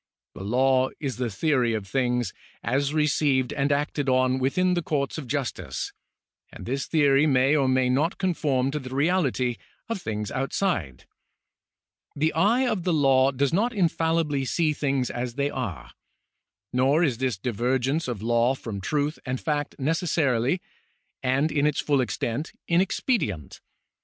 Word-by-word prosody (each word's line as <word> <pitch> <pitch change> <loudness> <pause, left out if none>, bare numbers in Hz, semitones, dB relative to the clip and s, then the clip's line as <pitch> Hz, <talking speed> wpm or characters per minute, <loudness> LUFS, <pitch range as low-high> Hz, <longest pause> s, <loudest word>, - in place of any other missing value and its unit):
The - - -8
law 130 +4 +2
is 135 -5 -3
the 125 -2 -1
theory 125 -1 +1
of 105 -3 -4
things, 125 +1 0 0.3
as 140 +2 0
received 150 -3 +1
and 140 0 0
acted 145 -1 0
on 130 0 +2
within 180 +8 +1
the 175 - 0
courts 150 -1 -2
of 140 - -8
justice, 120 - -3 0.6
and - - -10
this 135 +3 -2
theory 145 -2 +4
may 135 +1 +3
or 140 -3 +2
may 130 0 +2
not 145 +8 +1
conform 145 -8 0
to 150 - -2
the 130 -2 -8
reality 140 -6 +1 0.3
of 230 -5 -3
things 105 -4 -4
outside. 130 - -2 1.1
The 155 +3 +1
eye 225 +10 +3
of 215 -6 0
the 180 -1 +1
law 135 -3 +4
does 140 +1 0
not 230 +7 +1
infallibly 165 -6 +1
see 155 +4 +1
things 135 -3 -1
as 120 -1 -4
they 140 0 0
are. 115 - -5 0.8
Nor 135 +6 +3
is 130 -8 0
this 130 -6 0
divergence 125 - 0
of 115 -5 -4
law 120 +3 +2
from 110 -6 -6
truth 145 - -1
and 125 0 -3
fact 150 -2 -2
necessarily, 150 -1 +1 0.6
and 135 +4 +1
in 145 0 +2
its 150 - 0
full 140 -3 +2
extent, 125 +3 -3
inexpedient. 170 - 0
135 Hz, 150 wpm, -25 LUFS, 125-155 Hz, 1.1 s, theory